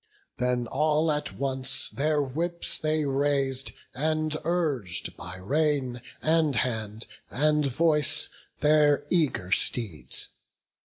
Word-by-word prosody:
Then 125 -1 0
all 155 +4 +1
at 150 0 -2
once 135 -1 +1
their 150 +1 0
whips 170 +6 -1
they 155 -1 0
rais'd, 135 -1 0 0.2
and 155 +2 -1
urg'd 150 - -1
By 90 +1 -7
rein, 135 +2 0 0.2
and 155 -3 +2
hand, 110 -2 -2 0.2
and 150 +1 +2
voice, 150 +1 +4 0.3
their 150 -1 +4
eager 150 - +1
steeds. 90 - 0
145 Hz, 105 wpm, -27 LUFS, 125-155 Hz, 0.3 s, voice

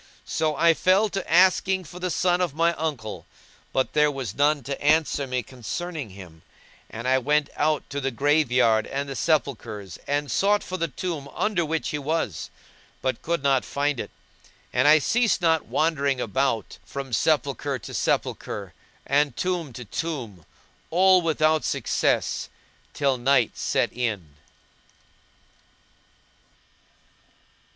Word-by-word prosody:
So 155 -1 0
I 165 +3 +5
fell 190 +6 +3
to 195 -6 -4
asking 185 +2 +4
for 175 +2 -11
the 185 0 -2
son 180 +1 +1
of 170 -6 -1
my 170 +1 +3
uncle; 145 -10 -4 0.4
but 130 -3 0
there 150 0 +4
was 135 -8 -4
none 145 +1 +2
to 140 +3 -5
answer 150 -2 +2
me 125 -1 -2
concerning 140 - -5
him; 90 -4 -12 0.5
and 115 +3 -6
I 130 0 +4
went 150 +3 +1
out 150 0 0
to 140 0 -3
the 135 - 0
grave 145 +2 +2
yard 115 -3 +3
and 140 +1 -3
the 135 - -5
sepulchres, 115 - -1
and 145 -1 -1
sought 205 - +2
for 185 - -5
the 170 -2 -1
tomb 155 0 -5
under 210 -5 +1
which 160 0 -2
he 150 - -2
was, 145 - -2 0.5
but 130 -3 -1
could 170 -3 -2
not 135 -2 +3
find 145 -2 -1
it; - - -4 0.6
and 130 +3 +3
I 155 +1 +8
ceased 235 - +2
not 160 -2 +2
wandering 140 -4 +1
about 125 -1 -1
from 135 -2 -7
sepulchre 140 0 +1
to 110 - -10
sepulchre, - - -2 0.3
and 140 -2 +1
tomb 180 -5 -2
to 125 +1 -8
tomb, 115 - -5 0.4
all 185 +2 +5
without 155 -1 +2
success, - - 0 0.5
till 140 -3 +1
night 125 -2 +2
set - - 0
in. 105 -11 -3
145 Hz, 145 wpm, -25 LUFS, 130-165 Hz, 0.6 s, I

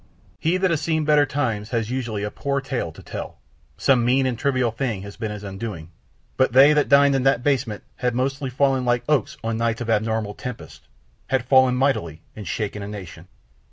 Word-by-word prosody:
He 170 +3 +1
that 185 -1 +1
has 160 - 0
seen 160 -2 0
better 150 -1 +4
times 115 -7 -2
has 115 -1 -2
usually 115 -5 -3
a 105 - -3
poor 140 0 -2
tale 130 -10 -3
to - - -14
tell, - - -7 0.4
some 130 -3 +3
mean 130 +3 +3
and 130 -2 0
trivial 130 -1 0
thing 115 -5 -3
has 100 0 -9
been 110 -2 -4
his 105 -1 -7
undoing, 95 -4 -6 0.5
but 130 -2 +2
they 140 +4 +8
that 150 -1 +2
dined 140 0 +6
in 135 - +1
that 130 -2 +2
basement 130 -7 0
had 125 -1 -1
mostly 135 +2 -1
fallen 135 0 +1
like 120 -1 +1
oaks 150 -8 +1
on 115 0 -1
nights 115 0 0
of 115 -1 -1
abnormal 110 -1 0
tempest, 125 - -9 0.4
had 130 -2 0
fallen 130 -1 +5
mightily 85 - 0
and 105 -2 -8
shaken 105 -1 -3
a 100 - -5
nation. 100 -5 -9
125 Hz, 200 wpm, -23 LUFS, 110-135 Hz, 0.5 s, they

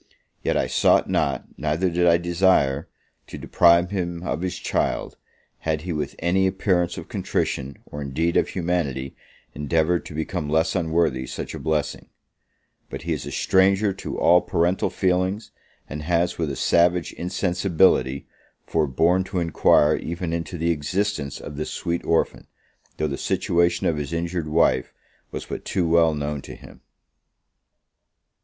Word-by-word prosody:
Yet - - 0
I - - +1
sought - - +3
not, - - 0
neither 80 +5 0
did 90 +1 +2
I 85 0 +6
desire, 85 -5 +2 0.4
to - - -8
deprive 85 +1 +4
him 85 -3 -3
of 85 - -2
his 90 -1 -3
child, - - -2 0.4
had 80 -1 -1
he 85 +1 -4
with 75 -1 -3
any 95 +3 +2
appearance 90 -2 0
of - - -7
contrition, 65 0 -2
or, 75 - -8
indeed, 80 +5 -1
of - - +3
humanity, 80 -7 -2 0.4
endeavoured 80 +4 0
to 75 - -9
become 75 -1 -3
less 80 +5 +1
unworthy 80 -7 0
such - - -6
a - - -6
blessing; 75 0 -2 0.8
but - - -7
he - - -1
is - - -5
a - - -5
stranger 95 +2 +3
to 95 - -6
all 90 +1 +5
parental 90 +1 0
feelings, 95 +3 0 0.4
and 75 0 -6
has 85 +2 0
with 80 -3 0
a 70 - -4
savage 85 +3 +2
insensibility, 90 -7 +1 0.4
forborne 80 +4 +2
to 95 - -5
enquire 80 -2 +3
even 85 0 -4
into 85 +1 -4
the 85 +1 +1
existence 80 -1 -2
of 75 - -9
this 75 - -3
sweet 85 0 -3
orphan, 85 - 0 0.5
though 75 - 0
the 70 - -4
situation 85 0 +1
of 80 - +1
his 75 +2 -4
injured 85 -1 -2
wife 75 -5 +1 0.3
was - - -6
but - - -6
too 90 -3 -1
well 80 -1 +4
known 75 -1 -3
to - - -10
him. - - -15
85 Hz, 155 wpm, -23 LUFS, 75-90 Hz, 0.8 s, I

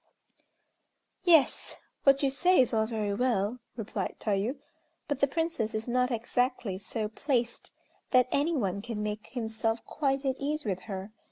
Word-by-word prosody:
"Yes! 325 -6 +4 0.3
what 275 0 +5
you 275 - +3
say 360 +7 +4
is 255 -3 +4
all 220 -1 +2
very 215 -3 -1
well," 235 0 +1 0.2
replied 210 -3 -3
Tayû, 210 +6 0 0.5
"but 290 -3 -1
the 280 - +4
Princess 280 -7 -1
is 220 +2 -3
not 250 +1 +2
exactly 240 -4 -1
so 215 +2 -3
placed 240 +1 -1 0.4
that 255 -1 +5
any 310 +4 +2
one 200 -4 -1
can 220 -1 -4
make 210 0 -4
himself 225 -1 -2
quite 275 -2 -1
at 265 -1 +1
ease 295 +1 -2
with 190 -3 -1
her. 195 +1 -5
240 Hz, 155 wpm, -29 LUFS, 215-270 Hz, 0.5 s, what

